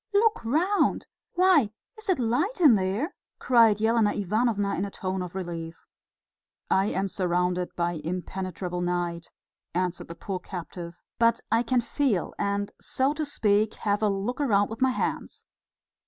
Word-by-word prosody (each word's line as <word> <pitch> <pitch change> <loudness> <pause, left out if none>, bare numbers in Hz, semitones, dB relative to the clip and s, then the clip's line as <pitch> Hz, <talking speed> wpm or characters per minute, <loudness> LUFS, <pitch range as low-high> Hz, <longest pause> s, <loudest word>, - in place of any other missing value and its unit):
"Look 435 - +3
round! 335 - +1 0.3
Why, 355 - +4 0.3
is 435 -2 -9
it 370 - +3
light 275 - 0
in 305 -8 +7
there?" 205 - 0 0.2
cried 230 -4 +4
Elena 220 -1 +3
Ivanovna 205 0 0
in 185 - -1
a 200 - -3
tone 190 -1 -3
of 180 0 -6
relief. 170 -3 -6 0.9
"I 190 +1 +3
am 195 -1 -1
surrounded 180 -1 -1
by 170 -2 -1
impenetrable 180 +1 -4
night," 175 -1 -2 0.5
answered 180 -1 -1
the 170 - -8
poor 185 +2 -4
captive; 175 -2 -8 0.2
"but 230 0 +4
I 230 - +4
can 245 +1 +1
feel 235 - 0
and, 200 0 -1
so 265 +2 0
to 305 -1 -3
speak, 215 -5 +1
have 205 0 -1
a 215 - +3
look 200 +7 -2
round 205 -7 +2
with 225 - -7
my 260 - +5
hands.... 255 - -3
205 Hz, 155 wpm, -27 LUFS, 180-245 Hz, 0.9 s, in